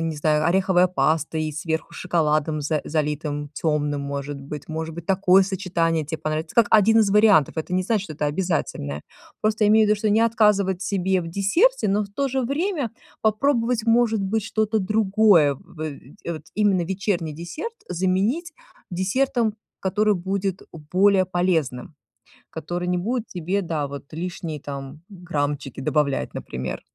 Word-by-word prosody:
не 165 -1 -2
знаю, 150 0 +2
ореховая 185 0 +3
паста 160 -1 0
и 155 -1 -2
сверху 160 +2 -3
шоколадом 155 -3 0
за 150 +1 0
залитым, 150 -1 -2
тёмным, 150 -1 -1
может 140 0 -5
быть. 145 +1 -8
Может 160 0 -4
быть, 170 0 -8
такое 190 0 +4
сочетание 175 -4 0
те 160 - -3
понравится 155 +1 -3
как 230 -3 +5
один 220 +1 +5
из 205 -2 +2
вариантов. 205 -8 +4
Это 160 +3 -3
не 185 - +2
значит, 210 +1 0
что 155 - -8
это 150 - -2
обязательное. 145 - -2 0.4
Просто 215 0 +2
имей 215 +1 +5
в - - 0
виду, 210 - +3
что 215 - 0
не 210 +2 +3
отказывать 210 -5 +3
себе 190 -1 0
в 165 - -6
десерте, 210 - +2
но 205 +2 +2
в - - -11
то 275 +8 -2
же 265 +1 -1
время 285 - -1 0.3
попробовать, 230 +1 +1
может 230 -2 +3
быть, 215 +3 0
что-то 220 0 0
другое. 200 -6 +4
В 155 - -16
эть 145 -1 -8
в 170 - -2
вот 155 - -7
именно 200 -3 +2
вечерний 180 -4 -2
десерт 240 - -6
заменить 190 - 0 0.4
десертом, 220 +5 0 0.2
который 210 +3 +1
будет 190 +1 -2 0.3
более 190 0 +4
полезным, 165 -8 -1 0.6
который 175 +3 -4
не 180 0 +1
будет 230 +6 -2
тебе, 180 +3 -2
да, 160 -5 -2
вот 140 0 -8
лишние 165 -2 -5
там 140 +1 -7
граммчики 145 -8 -3
добавлять, 140 0 0
например. 65 +1 -5
180 Hz, 160 wpm, -23 LUFS, 155-210 Hz, 0.6 s, как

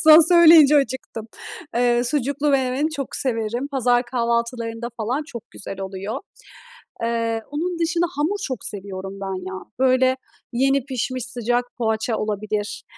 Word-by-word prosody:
Sen 315 0 +9
söyleyince 325 -4 +8
acıktım. 260 -5 -2 0.5
Eee, 240 0 +2
sucuklu 285 +2 0
menemeni 270 +2 +1
çok 280 -4 -4
severim. 235 +1 -2
Pazar 245 -3 +2
kahvaltılarında 235 -1 -2
falan 240 +6 -1
çok 235 -8 -9
güzel 195 0 -8
oluyor. 195 +5 -5 0.8
Eee, 230 -1 -1
onun 340 +4 -2
dışında 340 +1 +1
hamur 315 +8 0
çok 260 - -2
seviyorum 195 -1 -4
ben 190 -1 -4
ya. 185 0 -6 0.2
Böyle, 260 0 +3 0.4
yeni 270 +1 +2
pişmiş 255 -2 -3
sıcak 245 -1 0
poğaça 220 0 0
olabilir. 210 0 -3
245 Hz, 130 wpm, -22 LUFS, 225-275 Hz, 0.8 s, Sen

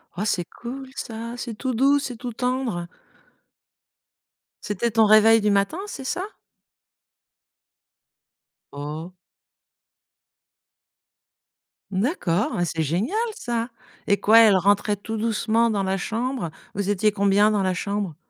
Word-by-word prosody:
Oh, 200 +4 -2
c'est 180 -5 0
cool 265 +7 -8
ça, 230 +1 -6
c'est 240 -2 -5
tout 255 +3 -3
doux, 275 +5 +4
c'est 260 -4 -4
tout 245 0 -6
tendre. 250 -8 -2 1.8
C'était 210 +3 -1
ton 220 0 +4
réveil 215 +1 +6
du 210 0 +2
matin, 200 - +1
c'est 275 -9 -7
ça? 355 +7 -2 2.5
Oh. 150 +5 -6 2.8
D'accord, 200 - 0
mais 175 - 0
c'est 160 -1 -2
génial 180 - -1 0.2
ça! 235 0 -3 0.4
Et 200 - +3
quoi, 225 +2 +6
elle 220 -3 +7
rentrait 205 +2 +2
tout 220 +2 -6
doucement 230 +1 +1
dans 205 -3 0
la 190 0 0
chambre? 230 0 -3 0.2
Vous 200 0 -2
étiez 205 +1 +2
combien 200 +1 +3
dans 210 -2 +1
la 185 -1 +1
chambre? 200 -2 -3
215 Hz, 125 wpm, -23 LUFS, 195-235 Hz, 2.8 s, elle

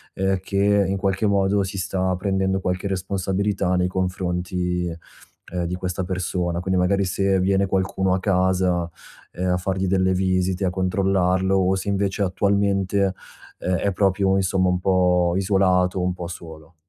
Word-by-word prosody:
uhm, 95 0 0
che 100 +1 +2
in 95 +1 -1
qualche 95 +2 0
modo 100 0 +2
si 95 +1 -5
sta 95 0 -1
prendendo 95 0 0
qualche 90 +1 -2
responsabilità 95 0 -1
nei 90 0 +1
confronti, 90 -1 -2 0.7
uhm, 90 -1 -1
di 90 +1 -3
questa 90 0 -3
persona, 90 -1 -2
quindi 95 0 0
magari 100 +2 +2
se 95 +1 +1
viene 95 +1 +2
qualcuno 95 0 0
a 95 - +1
casa, 90 -2 +1 0.5
uhm, 90 - -1
a - - +1
fargli 95 +1 -2
delle 95 0 +2
visite, 95 0 0
a - - +2
controllarlo, 95 0 +1
o 95 0 +2
se 95 +1 -3
invece 100 0 0
attualmente, 100 0 +1 0.5
ehm, 90 - -1
è 100 - 0
proprio 95 0 +2
insomma 95 -1 +1
un 90 0 0
po' 90 -2 +2
isolato, 95 -1 +2
un 90 0 0
po' 90 -1 -6
solo. 80 -1 -11
95 Hz, 155 wpm, -22 LUFS, 90-95 Hz, 0.7 s, che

